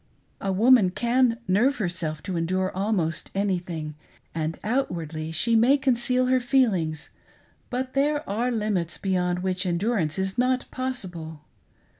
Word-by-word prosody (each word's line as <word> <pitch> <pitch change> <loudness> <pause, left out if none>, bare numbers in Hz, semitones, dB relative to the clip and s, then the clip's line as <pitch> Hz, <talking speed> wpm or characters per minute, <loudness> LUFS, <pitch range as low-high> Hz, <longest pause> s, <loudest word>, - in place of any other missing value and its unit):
A 195 - -2
woman 220 0 +5
can 240 +4 +2
nerve 230 +9 +3
herself 175 -6 -3
to 185 - -4
endure 185 +3 -1
almost 190 -5 -1
anything, 175 -6 -2 0.4
and 160 0 -2
outwardly 165 - -2
she 230 +8 +1
may 245 +6 +5
conceal 255 -1 +2
her 255 0 +3
feelings, 215 - +1 0.6
but 255 +1 -3
there 295 +2 +1
are 230 +5 0
limits 210 -7 -1
beyond 180 -2 -1
which 185 0 -1
endurance 175 -2 0
is 190 +4 -2
not 255 0 +2
possible. 180 - -5
195 Hz, 130 wpm, -25 LUFS, 175-250 Hz, 0.6 s, woman